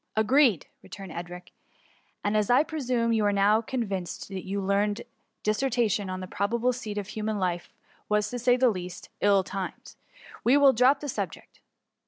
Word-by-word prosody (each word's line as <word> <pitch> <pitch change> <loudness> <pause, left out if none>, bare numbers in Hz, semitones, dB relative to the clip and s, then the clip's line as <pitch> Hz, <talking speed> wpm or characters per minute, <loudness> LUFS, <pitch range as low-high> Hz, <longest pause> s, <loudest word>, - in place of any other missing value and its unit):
*^ - - -55
" - - -52
Agreed 240 - +4
!'' - - -49
returned 195 -2 -10
Edric; 175 +2 -8 0.4
" - - -37
and 205 +1 +1
as 210 -1 +1
I 250 +4 +5
pre 315 -1 -5
sume 235 -2 +1
you 220 -1 +2
are 205 - +3
now 205 +2 +3
convinced 200 -8 -4
your 195 +1 -4
learned 205 +3 0 0.4
dis 215 0 +1
sertation 230 -6 0
on 185 0 -4
the 185 - -6
probable 230 +6 0
seat 215 -4 -6
of 205 0 -4
human 215 0 -3
life 180 -3 -2 0.4
was, 210 0 +2
to 245 - -3
say 245 +1 +3
the 255 0 +4
least, 180 -2 -7
ill 200 -1 +4
timed, 190 0 -6 0.5
we 255 +4 +5
will 280 -2 +6
drop 255 +4 +4
the 295 - -5
sub 200 - -3
ject. - - -16
210 Hz, 200 wpm, -27 LUFS, 195-245 Hz, 0.5 s, will